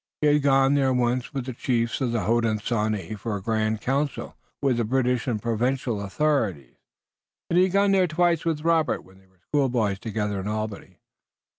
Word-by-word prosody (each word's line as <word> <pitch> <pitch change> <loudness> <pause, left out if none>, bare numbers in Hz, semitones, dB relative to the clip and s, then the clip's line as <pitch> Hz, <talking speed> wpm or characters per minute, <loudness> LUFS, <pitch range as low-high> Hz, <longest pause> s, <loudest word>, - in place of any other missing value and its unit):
He - - +1
had 150 - +3
gone 135 -1 +4
there 135 -2 +2
once 125 0 0
with 135 -4 -4
the 130 - -5
chiefs 120 0 -1
of 125 -3 0
the 115 -2 0
Hodenosaunee 110 -2 0
for 110 +1 -3
a 100 - -5
grand 110 -1 0
council 140 0 -2 0.2
with 135 -4 +1
the 120 - +1
British 125 +1 0
and 115 -4 0
provincial 120 0 -1
authorities, 100 - -1 0.7
and 170 - +3
he 185 - +6
had 190 - -3
gone 195 -2 +3
twice 170 0 +1
with 160 -3 -1
Robert 165 -1 +1
when 95 +1 -19
they 95 - -25
were 95 0 -32
schoolboys 120 -9 0
together 105 -3 -3
in 95 - -5
Albany. 110 -1 -5
120 Hz, 180 wpm, -25 LUFS, 110-140 Hz, 0.7 s, he